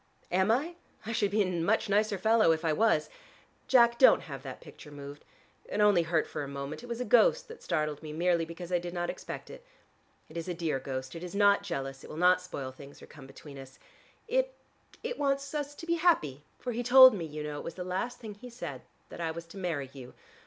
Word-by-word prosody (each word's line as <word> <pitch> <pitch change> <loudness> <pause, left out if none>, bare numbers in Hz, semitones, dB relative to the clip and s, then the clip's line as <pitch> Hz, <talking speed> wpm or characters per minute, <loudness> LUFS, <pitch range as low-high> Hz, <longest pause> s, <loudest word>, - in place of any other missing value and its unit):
"Am 190 +3 +2
I? 300 +10 +1 0.3
I 225 - -4
should 210 -3 +1
be 210 +1 +2
a - - -1 0.2
much 215 +7 +1
nicer 205 0 +2
fellow 220 -2 +4
if 160 +1 -1
I 160 - +2
was. 160 -5 +2 0.6
Jack, 235 -2 +5
don't 260 - +7
have 135 -3 -8
that 130 -2 -8
picture - - -13
moved. 145 0 -10 0.4
It - - -4
only 205 -4 +5
hurt 165 -1 +1
for - - -5
a - - -5
moment: 140 +4 -6
it 245 - -10
was 235 0 -4
a 250 - -2
ghost - - +4
that 465 - -11
startled 150 -2 -2
me 155 -1 -7
merely 170 +1 +1
because 170 +2 -8
I 175 - +2
did 175 +1 -7
not 175 0 -1
expect - - -8
it. - - -11 0.6
It 155 - -10
is 165 - -4
a 180 - -3
dear 165 -5 -1
ghost: 130 -1 -5
it 165 - -7
is 180 +2 -7
not 200 0 +5
jealous, 135 -8 -5
it - - -11
will 155 - -8
not 180 +2 +4
spoil 140 -7 -6
things 140 +2 -13
or - - -12
come 135 -3 -13
between 140 +1 -12
us. 135 0 -12 0.5
It - - 0 0.5
it 485 +1 -4
wants 275 0 0
us 290 -1 -3
to 330 - -9
be 340 0 +1
happy, 155 - +2 0.2
for 250 - -4
he 240 +1 -2
told 255 +1 +9
me, 180 -5 -3
you 150 -1 -6
know, 150 -1 -5
it - - -7
was 165 - -6
the 180 - -5
last 190 +8 -3
thing 220 -4 -8
he 245 +5 -11
said 240 +1 -7 0.3
that - - -8
I 165 - -1
was 165 +1 -6
to 165 +4 -13
marry 150 -8 -3
you. 130 -3 -11
180 Hz, 240 wpm, -30 LUFS, 150-235 Hz, 0.6 s, told